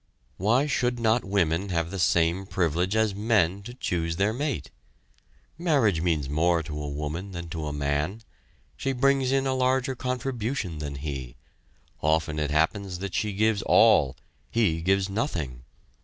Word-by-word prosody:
Why 115 Hz, +9 st, +3 dB
should 125 Hz, -4 st, 0 dB
not 115 Hz, +1 st, +2 dB
women 95 Hz, -1 st, 0 dB
have 85 Hz, -1 st, -1 dB
the 95 Hz, -, -4 dB
same 85 Hz, +2 st, +2 dB
privilege 90 Hz, +2 st, 0 dB
as 110 Hz, -2 st, +2 dB
men 100 Hz, -3 st, +1 dB
to 120 Hz, +5 st, -9 dB
choose 85 Hz, -8 st, -2 dB
their 100 Hz, +4 st, +1 dB
mate? 120 Hz, -, -3 dB, 0.9 s
Marriage 135 Hz, -, +2 dB
means 80 Hz, -5 st, 0 dB
more 85 Hz, +3 st, +2 dB
to 75 Hz, -1 st, -5 dB
a 75 Hz, -, -4 dB
woman 75 Hz, +7 st, -4 dB
than 85 Hz, -1 st, -6 dB
to 80 Hz, -3 st, -4 dB
a -, -, -3 dB
man; 75 Hz, +9 st, -2 dB, 0.5 s
she 135 Hz, -, -2 dB
brings 135 Hz, 0 st, +2 dB
in 135 Hz, 0 st, +2 dB
a 135 Hz, -, +1 dB
larger 130 Hz, 0 st, +1 dB
contribution 125 Hz, -, -3 dB
than 75 Hz, -2 st, -4 dB
he; 70 Hz, -4 st, -5 dB, 0.7 s
often 80 Hz, 0 st, +1 dB
it 75 Hz, -1 st, -1 dB
happens 90 Hz, +5 st, 0 dB
that 95 Hz, +1 st, -5 dB
she 105 Hz, -, 0 dB
gives 110 Hz, 0 st, +2 dB
all 70 Hz, -6 st, +5 dB, 0.3 s
he 100 Hz, -9 st, +1 dB
gives 95 Hz, +2 st, +2 dB
nothing. 85 Hz, -, -3 dB
95 Hz, 155 wpm, -26 LUFS, 80-115 Hz, 0.9 s, all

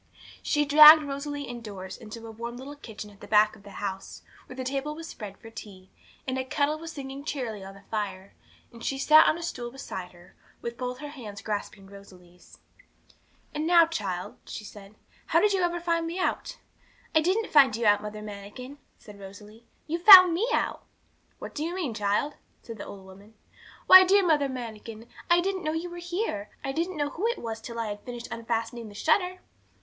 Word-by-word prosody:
She 295 Hz, 0 st, +1 dB
dragged 305 Hz, +2 st, +9 dB
Rosalie 285 Hz, 0 st, -5 dB
indoors 210 Hz, -7 st, -8 dB
into 225 Hz, +1 st, -10 dB
a 225 Hz, -, -8 dB
warm 235 Hz, +2 st, -7 dB
little 275 Hz, +3 st, -9 dB
kitchen 220 Hz, -6 st, -10 dB
at 200 Hz, -, -20 dB
the -, -, -10 dB
back 210 Hz, 0 st, +4 dB
of -, -, -17 dB
the 200 Hz, -, -13 dB
house, 195 Hz, -1 st, -6 dB, 0.2 s
where 255 Hz, -, -10 dB
the 260 Hz, -, -5 dB
table 275 Hz, +3 st, -3 dB
was 330 Hz, +1 st, -8 dB
spread 205 Hz, -8 st, -9 dB
for 225 Hz, -, -13 dB
tea, 195 Hz, -4 st, -12 dB, 0.4 s
and 260 Hz, 0 st, -2 dB
a -, -, -1 dB
kettle 290 Hz, +4 st, -1 dB
was 330 Hz, 0 st, -8 dB
singing 275 Hz, -2 st, -8 dB
cheerily 240 Hz, -9 st, -4 dB
on 195 Hz, 0 st, -10 dB
the 200 Hz, -, -15 dB
fire; 200 Hz, -3 st, -4 dB, 0.4 s
and 230 Hz, 0 st, -13 dB
she 270 Hz, -, -2 dB
sat 310 Hz, +3 st, +6 dB
on 310 Hz, -, +2 dB
a 340 Hz, -, -7 dB
stool 245 Hz, -7 st, -5 dB
beside 190 Hz, -8 st, -8 dB
her, 175 Hz, 0 st, -19 dB, 0.2 s
with 235 Hz, 0 st, -6 dB
both 250 Hz, 0 st, -5 dB
her 295 Hz, -, -9 dB
little 290 Hz, -4 st, -9 dB
hands 205 Hz, -2 st, -9 dB
grasping 205 Hz, -2 st, -5 dB
Rosalie's. 185 Hz, -3 st, -16 dB, 1.0 s
'And 305 Hz, +1 st, -2 dB
now, 340 Hz, -1 st, +6 dB
child,' 195 Hz, -, -5 dB
she -, -, -7 dB
said, 205 Hz, 0 st, -13 dB, 0.3 s
'how -, -, +2 dB
ever -, -, +5 dB
did -, -, -1 dB
you 350 Hz, -2 st, 0 dB
find 335 Hz, -1 st, 0 dB
me 335 Hz, +2 st, -5 dB
out?' 370 Hz, -, -2 dB, 0.6 s
'I 315 Hz, -, +4 dB
didn't 385 Hz, +7 st, 0 dB
find 275 Hz, -7 st, +6 dB
you 230 Hz, 0 st, -2 dB
out, 205 Hz, -1 st, +4 dB
Mother 210 Hz, 0 st, -7 dB
Manikin,' 210 Hz, +7 st, -9 dB, 0.2 s
said 205 Hz, -2 st, -14 dB
Rosalie; 210 Hz, +4 st, -13 dB, 0.2 s
'you 335 Hz, +2 st, -3 dB
found 365 Hz, -1 st, +10 dB
me 400 Hz, +8 st, 0 dB
out.' -, -, -1 dB, 0.5 s
'What -, -, -9 dB
do 295 Hz, -, -5 dB
you 340 Hz, +3 st, -3 dB
mean, 325 Hz, -11 st, -3 dB
child?' 210 Hz, +7 st, -1 dB, 0.3 s
said 225 Hz, -2 st, -9 dB
the -, -, -7 dB
old 195 Hz, -1 st, -11 dB
woman. 200 Hz, +3 st, -16 dB, 0.5 s
'Why, 375 Hz, 0 st, +10 dB
dear 390 Hz, +1 st, +4 dB
Mother 295 Hz, -4 st, +2 dB
Manikin, 230 Hz, -2 st, -8 dB, 0.2 s
I 345 Hz, 0 st, +5 dB
didn't 380 Hz, 0 st, -2 dB
know 310 Hz, 0 st, -1 dB
you 340 Hz, +2 st, -4 dB
were 350 Hz, -, -8 dB
here. 345 Hz, -, -4 dB
I 270 Hz, -, -2 dB
didn't 335 Hz, +4 st, -3 dB
know 290 Hz, -1 st, -1 dB
who 405 Hz, +7 st, -2 dB
it 475 Hz, -, -1 dB
was 225 Hz, -1 st, -6 dB
till 235 Hz, +1 st, -8 dB
I 230 Hz, -, -1 dB
had 205 Hz, 0 st, -6 dB
finished 240 Hz, -1 st, -7 dB
unfastening 230 Hz, 0 st, -3 dB
the 205 Hz, -, -14 dB
shutter.' 360 Hz, -, +1 dB
245 Hz, 205 wpm, -27 LUFS, 210-315 Hz, 1.0 s, found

